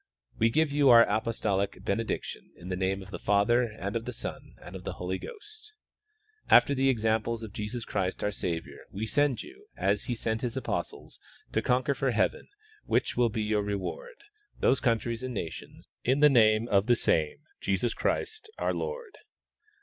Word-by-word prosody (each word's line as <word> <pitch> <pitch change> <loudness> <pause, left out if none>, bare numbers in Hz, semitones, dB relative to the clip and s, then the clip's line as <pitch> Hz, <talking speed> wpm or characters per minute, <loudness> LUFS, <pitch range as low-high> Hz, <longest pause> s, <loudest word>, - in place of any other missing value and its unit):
We 115 - +4
give 155 +4 +2
you 145 -1 +4
our 115 -1 +9
apostolic 105 -2 -1
benediction, 110 +3 -3
in 90 - -10
the 90 - -1
name 95 +1 -1
of 95 - -14
the - - -6
Father 105 +5 +3
and 105 -3 -4
of 115 0 -2
the 125 - -4
Son - - -7
and - - -11
of - - -8
the - - -4
Holy 90 +1 -3
Ghost. 430 0 -11 0.8
After 140 - +7
the 135 0 +2
example 110 -1 +1
of 110 -3 -8
Jesus 105 +3 -4
Christ 95 -2 -2
our 105 - +1
Savior, 85 -4 -5
we 105 +3 -3
send 145 +2 +1
you, 405 +3 -15
as 100 +1 +1
He 120 - -2
sent 110 0 -2
His 120 -2 -3
apostles, - - -4 0.3
to - - +2
conc|uer 125 +2 +1
for 135 0 0
heaven, 110 -5 0 0.4
which - - +1
will 120 -1 +3
be 110 0 -2
your 105 0 +1
reward, 105 - -4 0.4
those 135 - +3
countries 115 -1 0
and 130 -2 -4
nations 85 -5 -7 0.2
in 130 +3 +2
the 150 0 +7
name 110 -2 +4
of 100 +1 +3
the 120 - +5
same 80 -8 +1 0.2
Jesus 100 +4 0
Christ 435 0 -2
our - - 0
Lord. 470 -3 -5
115 Hz, 180 wpm, -29 LUFS, 100-130 Hz, 0.8 s, our